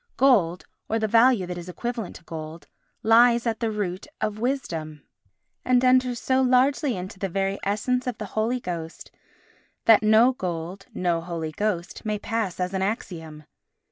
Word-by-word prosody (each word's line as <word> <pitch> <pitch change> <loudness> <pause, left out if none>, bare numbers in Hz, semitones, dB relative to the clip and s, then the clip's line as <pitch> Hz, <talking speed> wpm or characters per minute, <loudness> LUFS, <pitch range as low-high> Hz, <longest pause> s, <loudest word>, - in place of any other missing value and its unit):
Gold, 200 -10 +3 0.2
or 225 - +1
the 220 -1 0
value 230 -2 +4
that 175 0 -5
is 175 +1 -9
equivalent 235 +1 -4
to - - -12
gold, 160 -1 -8 0.4
lies 235 +2 +5
at 225 -1 -1
the 230 - 0
root 200 -3 -3
of 215 0 -2
Wisdom, 165 - -3 0.6
and 250 0 +3
enters 255 -1 +3
so 260 +2 +1
largely 260 0 +2
into 185 +1 -7
the 195 - -2
very 195 +2 -1
essence 250 +6 -1
of 245 -3 -2
the 215 - -5
Holy 225 +4 0
Ghost 170 -6 -6 0.7
that 225 -3 +7
"No 220 +4 +5
gold, 180 -2 -5
no 175 -2 0
Holy 165 -2 -4
Ghost" 185 0 -3
may 215 -1 -1
pass 210 -3 -3
as 180 +1 -2
an 190 - -1
axiom. 165 -7 -4
210 Hz, 165 wpm, -25 LUFS, 175-240 Hz, 0.7 s, that